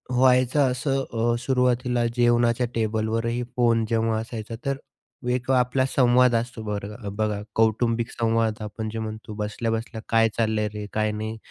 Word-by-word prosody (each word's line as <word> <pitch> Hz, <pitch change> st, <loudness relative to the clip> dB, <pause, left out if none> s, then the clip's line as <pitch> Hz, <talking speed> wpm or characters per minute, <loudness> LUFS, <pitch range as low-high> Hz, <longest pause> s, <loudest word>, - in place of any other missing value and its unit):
व्हायचं 130 Hz, +1 st, +4 dB
असं, 135 Hz, +1 st, 0 dB
अ, 115 Hz, +1 st, +1 dB
सुरुवातीला 125 Hz, -1 st, +1 dB
जेवणाच्या 120 Hz, 0 st, +3 dB
टेबलवरही 115 Hz, +2 st, 0 dB
फोन 115 Hz, -2 st, +3 dB
जेव्हा 115 Hz, -1 st, +1 dB
असायचा 115 Hz, 0 st, -6 dB
तर 135 Hz, 0 st, 0 dB, 0.5 s
1 125 Hz, +1 st, -2 dB
आपला 130 Hz, +1 st, +2 dB
संवाद 125 Hz, -1 st, +5 dB
असतो 115 Hz, 0 st, -2 dB
बरं 105 Hz, 0 st, -5 dB
बघा 105 Hz, -1 st, 0 dB
कौटुंबिक 115 Hz, +1 st, +1 dB
संवाद, 115 Hz, -1 st, +1 dB
आपण 110 Hz, +1 st, -5 dB
जे 110 Hz, +1 st, -5 dB
म्हणतो 110 Hz, -1 st, -6 dB
बसल्या-बसल्या 110 Hz, +2 st, -3 dB
"काय 115 Hz, 0 st, +4 dB
चाललंय 110 Hz, -2 st, +1 dB
रे? 105 Hz, 0 st, -5 dB
काय 110 Hz, 0 st, +1 dB
नाही?" 110 Hz, +1 st, -4 dB
115 Hz, 140 wpm, -25 LUFS, 110-125 Hz, 0.5 s, संवाद